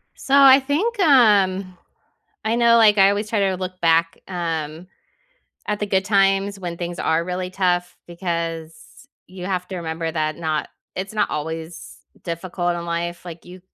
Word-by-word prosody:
So, 275 - -5
I 275 -1 +8
think, 330 - -1
um 200 - +3 0.7
I 220 +1 0
know, 235 -1 +5
like, 215 -2 +5
I 195 0 +6
always 205 +2 -2
try 220 - 0
to 190 -1 +1
look 185 0 -6
back, 165 0 +2
um, 165 -2 -4 0.8
at 210 0 -2
the 210 - -1
good 190 -1 +1
times 195 0 +1
when 175 -2 -5
things 175 0 -5
are 165 +1 +1
really 180 +1 -4
tough 180 -2 -1
because 165 -2 -4 0.5
you 185 -1 -8
have 180 -2 -2
to 190 - -6
remember 165 -1 -4
that 155 -2 -2
not 155 -2 -2 0.3
it's 190 +2 -5
not 215 - +1
always 160 +2 -6 0.3
difficult 175 +1 -3
in 170 - -5
life. 170 +1 -4
Like, 170 -1 -10
you 180 +1 -12
180 Hz, 165 wpm, -21 LUFS, 170-200 Hz, 0.8 s, I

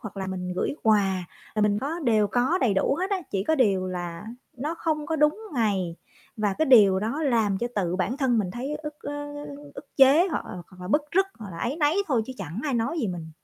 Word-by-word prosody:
hoặc 210 -2 -8
là 190 -1 -3
mình 180 -1 -4
gửi 280 - -1
quà, 195 -4 +2 0.3
là 215 - +1
mình 205 0 +2
có 310 +7 -3
đều 215 -3 +3
có 250 - +1
đầy 230 - +2
đủ 195 +8 +2
hết 380 +2 -1
á, 395 - +2
chỉ 195 0 -1
có 315 - +2
điều 195 -9 +2
là 175 -1 -5 0.3
nó 295 +6 -3
không 305 -2 -1
có 320 - -1
đúng 300 +6 +2
ngày 195 -7 0 0.4
và 205 -2 0
cái 315 - +2
điều 205 -7 +7
đó 235 +9 -2
làm 225 -8 +2
cho 240 - -1
tự 180 -3 0
bản 235 +7 -1
thân 260 -5 +2
mình 190 -4 -1
thấy 265 +7 -4
ức, 300 -1 -7
ơ, - - -5
ơ, 290 0 -6 0.3
ức 285 - -9
chế 275 +6 +6
hoặc 320 - -2
là - - -8 0.2
hoặc 185 -1 -16
là 180 - -7
bứt 295 +8 +3
rứt, 385 +2 +4
hoặc 210 -4 -8
là 165 - -8
áy 250 - -2
náy 305 +1 +2
thôi 245 -7 +1
chứ 260 - -6
chẳng 180 +2 -5
ai 280 - 0
nói 235 +8 -1
gì 225 - 0
mình. 165 -3 -6
230 Hz, 250 wpm, -26 LUFS, 190-290 Hz, 0.4 s, điều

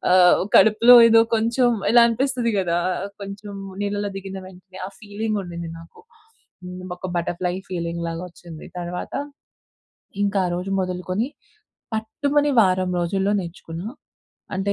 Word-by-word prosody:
ఆహ్, 180 -1 +6 0.2
కడుపులో 230 +3 +7
ఏదో 225 0 +7
కొంచెం 235 +3 +2 0.2
ఇలా 240 0 +7
అనిపిస్తది 245 0 0
కదా! 175 -2 +1 0.4
కొంచెం 200 +1 -8 0.3
నీళ్ళలో 205 0 -2
దిగిన 195 0 -6
వెంటనే 185 0 -14
ఆ - - -6
ఫీలింగ్ 215 0 -3
ఉండింది 170 -2 -6
నాకు. 165 - -16 0.6
హ్మ్. 180 0 -8 0.2
ఒక 185 - -5
బటర్‌ఫ్లై 175 +1 -2 0.2
ఫీలింగ్ 170 -1 -3
లాగ 165 0 -4
వచ్చింది. 170 -2 -12
తర్వాత, 175 +1 -5 1.1
ఇంకా 200 -1 +1
ఆ - - -1
రోజు 185 +2 -4
మొదలుకొని, 185 +6 -2 0.7
పట్టుమని 285 +7 0
వారం 185 -1 +1
రోజుల్లో 195 +4 0
నేర్చుకున్నా. 170 +1 -7 0.7
అంటే 195 +2 0
190 Hz, 125 wpm, -22 LUFS, 180-220 Hz, 1.1 s, కడుపులో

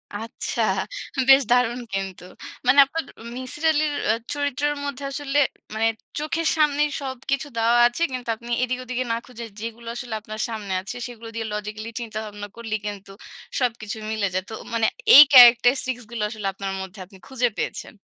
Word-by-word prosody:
আচ্ছা, 225 +2 -4 0.7
বেশ 270 +1 +9
দারুণ 245 0 +3
কিন্তু। 195 -2 -4 0.4
মানে 275 +3 +6
আপনার 320 +3 -4 0.3
মিসির 260 +4 -6
আলির 305 -1 +1 0.2
এ - - +4 0.2
চরিত্রের 290 0 -1
মধ্যে 280 -1 -5
আসলে 290 0 -1 0.3
মানে, 225 +1 +1 0.3
চোখের 315 +2 -1
সামনেই 300 -1 +3
সবকিছু 270 +2 -3
দেওয়া 230 +1 +3
আছে। 240 +7 -6
কিন্তু 250 -2 -5
আপনি 235 +2 -10
এদিক 255 0 -1
ওদিকে 255 0 -2
না 230 - +1
খুঁজে, 240 -2 -9
যেগুলো 230 +1 -7
আসলে 240 -2 -6
আপনার 215 0 -6
সামনে 210 -4 -4
আছে, 200 +5 -7
সেগুলো 230 -1 -10
দিয়ে 225 -1 -3
লজিক্যালি 210 +1 -5
চিন্তাভাবনা 215 -2 -6
করলেই 220 -2 -4
কিন্তু 200 -1 -7 0.5
সবকিছু 230 -3 -2
মিলে 215 -2 0
যায়। 185 0 -1
তো - - -7 0.2
মানে 225 -1 +2 0.3
এই 290 - +13
ক্যারাক্টারিস্টিক্স 245 +1 +7
গুলো 225 -3 -3
আসলে 210 -3 -5
আপনার 195 0 -4
মধ্যে 190 +1 -9
আপনি 195 +1 -17
খুঁজে 250 -2 0
পেয়েছেন। - - -4
235 Hz, 165 wpm, -23 LUFS, 215-265 Hz, 0.7 s, এই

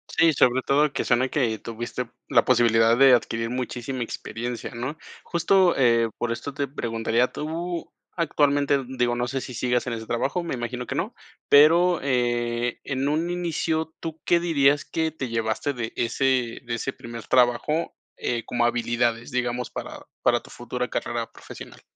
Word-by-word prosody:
Sí, 165 -1 +5
sobre 130 -1 +3
todo 145 +2 +2
que - - -1
suena 130 +2 +2
que 125 -6 0
tuviste 120 +1 -5 0.2
la 120 -4 +4
posibilidad 115 -2 +4
de 135 0 +7
adquirir 115 -1 +1
muchísima 125 0 -4
experiencia, 120 +1 -5
¿no? 125 +6 -4 0.3
Justo, 180 +1 +3
eh, 115 -3 +4
por 120 - -2
esto 140 +4 -4
te 140 0 -2
preguntaría, 115 -2 0
tú 165 +4 -5 0.2
actualmente, 145 -3 +2
digo, 125 -2 0
no 120 0 -1
sé, 135 +1 -3
si 125 - -7
sigas 125 +1 0
en 120 - -3
ese 110 -1 -6
trabajo, 135 +9 -1
me 170 - -3
imagino 125 0 -4
que - - -4
no, - - -2 0.4
pero, 170 +4 +6
eh, 120 -2 0
en 135 0 -2
un 160 +3 0
inicio, 165 -2 -1
¿tú 160 -1 -6
qué 170 - +4
dirías 145 -4 +3
que 160 -1 -1
te 135 -4 -5
llevaste 115 +4 -1
de 120 -2 -4
ese 125 0 0
de 120 -1 -3
ese 115 - -3
primer 115 -1 -9
trabajo, 130 +6 +2 0.2
eh, 120 -1 -2
como 120 -1 0
habilidades, 120 0 0
digamos, 125 -1 -1
para - - -7 0.2
para - - +4
tu - - -17
futura - - -4
carrera - - -3
profesional? - - -11
125 Hz, 165 wpm, -25 LUFS, 120-145 Hz, 0.4 s, de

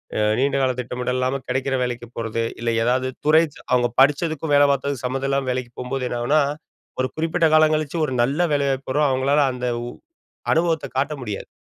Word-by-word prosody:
அ, - - 0 0.2
நீண்ட 140 +1 +1
கால 130 -1 +2
திட்டமிட 125 0 -3
இல்லாம, 130 +2 0
கிடைக்கிற 130 +1 -1
வேலைக்கு 120 -1 -4
போறது. 115 0 -2 0.2
இல்ல, 120 - -1
ஏதாவது 130 +2 +1 0.2
துறை 160 +2 +6 0.3
அவங்க 120 -1 +3
படிச்சதுக்கும், 150 +1 +2
வேல 145 0 +6
பாத்ததுக்கு 140 -1 -2
சம்மதம் 135 +2 -2
இல்லாம 135 -1 0
வேலைக்கு 125 -1 -4
போம்போது 125 0 -3
என்னனாகுனா, 120 +6 +2 0.6
ஒரு 130 - +1
குறிப்பிட்ட 165 +1 +1
காலங் 155 0 +5
கழிச்சு, 155 +1 -3
ஒரு 130 - -4
நல்ல 140 +7 0
வேலை 140 -1 +1
வாய்ப்பு 135 0 -4
வரும். 145 -1 +3
அவங்களால 135 +3 +2
அந்த 125 0 -3 0.9
அனுபவத்தைக் 165 -4 0
காட்ட 145 +2 0
முடியாது. 105 -3 -5
135 Hz, 175 wpm, -22 LUFS, 125-145 Hz, 0.9 s, துறை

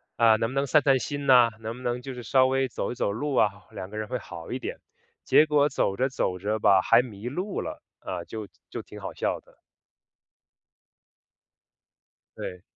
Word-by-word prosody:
啊， 115 -1 +5
能 115 +1 0
不 - - -7
能 140 +1 +2
散 150 +3 +5
散 135 -2 +4
心 145 +1 -4
呐， 125 -3 +7
能 115 +1 -5
不 125 - -11
能 120 0 -1
就 135 +1 -6
是 125 -1 -8
稍 130 +3 +4
微 135 0 +1
走 - - -3
一 125 - -5
走 100 - 0
路 135 +6 -2
啊， 105 - +4 0.2
两 95 - -7
个 105 - -8
人 110 0 -3
会 125 - -2
好 85 -3 -9
一 130 - -2
点。 - - -5 0.4
结 155 - +5
果 150 -1 +3
走 100 -7 0
着 130 - +2
走 90 -8 -1
着 105 +3 -1
吧， 95 -2 +5
还 115 +5 +5
迷 115 -2 -8
路 185 +9 -3
了， - - -6 0.2
啊， 90 -2 -5
就 110 +3 -7 0.2
就 - - -5
挺 - - -12
好 - - -5
笑 - - -1
的。 - - -24 2.8
对。 90 0 -6
120 Hz, 215 characters per minute, -26 LUFS, 105-135 Hz, 2.8 s, 呐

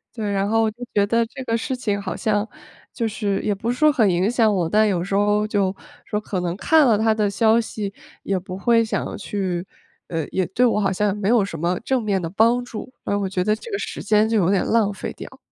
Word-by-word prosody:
对， 215 -3 -3
然 195 0 0
后 225 0 +2
就 220 - -23 0.2
觉 205 -1 +3
得 230 +2 +2
这 260 +3 -9
个 230 -2 -1
事 260 +3 -3
情 205 -5 -2
好 185 -2 -4
像 210 0 0 0.5
就 230 - -1
是 205 -2 -1
也 210 - +1
不 225 +5 -2
是 250 - -4
说 305 0 +5
很 220 -8 +3
影 180 +3 +1
响 225 -3 +3
我， 175 -4 0
但 215 +4 +4
有 180 -4 0
时 195 - -5
候 205 +1 +2
就 200 -2 0 0.3
说 210 - -2
可 205 -3 -4
能 175 0 -2
看 315 +5 +4
了 220 -3 +4
他 220 +1 +3
的 210 -2 +1
消 225 +2 +3
息， 210 -3 -5 0.3
也 195 - 0
不 185 0 -8
会 230 +3 +3
想 220 - -3
去 190 -3 -3 0.4
呃， 165 -3 -2
也 185 -2 0
对 240 +7 +2
我 230 -3 +2
好 195 -2 +1
像 205 +1 0
没 205 -1 -1
有 230 -4 +4
什 165 -6 -7
么 175 +2 0
正 260 +1 0
面 205 -3 0
的 165 - -3
帮 230 +6 +3
助， 245 +1 -8
然 200 - -1
后 - - -2
我 190 - -2
觉 185 -1 -1
得 215 +2 +2
这 465 - -11
个 400 - -1
时 - - -5
间 210 +1 +3
就 225 - +1
有 185 -3 +2
点 195 -2 +2
浪 220 -3 +2
费 190 - -5
掉。 - - -11
210 Hz, 275 characters per minute, -22 LUFS, 195-225 Hz, 0.5 s, 说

